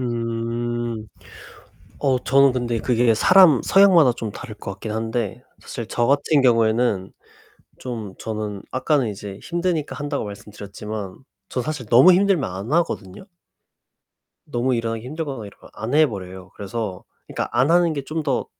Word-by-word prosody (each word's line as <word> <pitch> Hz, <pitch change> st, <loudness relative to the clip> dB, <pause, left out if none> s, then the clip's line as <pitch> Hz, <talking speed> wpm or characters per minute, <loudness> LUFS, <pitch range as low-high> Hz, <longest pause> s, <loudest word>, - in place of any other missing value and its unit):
음. 115 Hz, -1 st, -3 dB, 0.9 s
어 130 Hz, -3 st, +2 dB
저는 140 Hz, 0 st, +5 dB
근데 120 Hz, -2 st, -2 dB
그게 120 Hz, -1 st, +2 dB
사람 170 Hz, -, +6 dB
성향마다 185 Hz, -8 st, +6 dB
좀 115 Hz, -3 st, -5 dB
다를 115 Hz, -1 st, -9 dB
것 105 Hz, -, -7 dB
같긴 100 Hz, +3 st, -7 dB
한데 110 Hz, 0 st, -3 dB, 0.2 s
사실 115 Hz, -3 st, -7 dB
저 120 Hz, 0 st, 0 dB
같은 145 Hz, +1 st, +3 dB
경우에는 115 Hz, -5 st, +2 dB, 0.7 s
좀 110 Hz, -6 st, -6 dB
저는 105 Hz, -2 st, -5 dB
아까는 130 Hz, -1 st, +1 dB
이제 100 Hz, -1 st, -7 dB
힘드니까 170 Hz, -3 st, -2 dB
한다고 145 Hz, -4 st, -3 dB
말씀드렸지만 100 Hz, 0 st, -8 dB, 0.3 s
저 125 Hz, -, -2 dB
사실 150 Hz, -5 st, -4 dB
너무 125 Hz, -, +7 dB
힘들면 190 Hz, -, +2 dB
안 95 Hz, +8 st, -6 dB
하거든요. 155 Hz, -, -1 dB, 1.2 s
너무 125 Hz, +2 st, -1 dB
일어나기 115 Hz, -1 st, -3 dB
힘들거나 140 Hz, -6 st, -5 dB
이러면 100 Hz, -, -15 dB
안 115 Hz, +5 st, -4 dB
해버려요. 95 Hz, -, 0 dB
그래서 100 Hz, -2 st, -5 dB, 0.2 s
그니까 -, -, -3 dB
안 125 Hz, +6 st, +2 dB
하는 175 Hz, -1 st, +4 dB
게 140 Hz, -2 st, -3 dB
좀 160 Hz, +2 st, -3 dB
더 140 Hz, -4 st, -1 dB
120 Hz, 305 characters per minute, -22 LUFS, 110-140 Hz, 1.2 s, 너무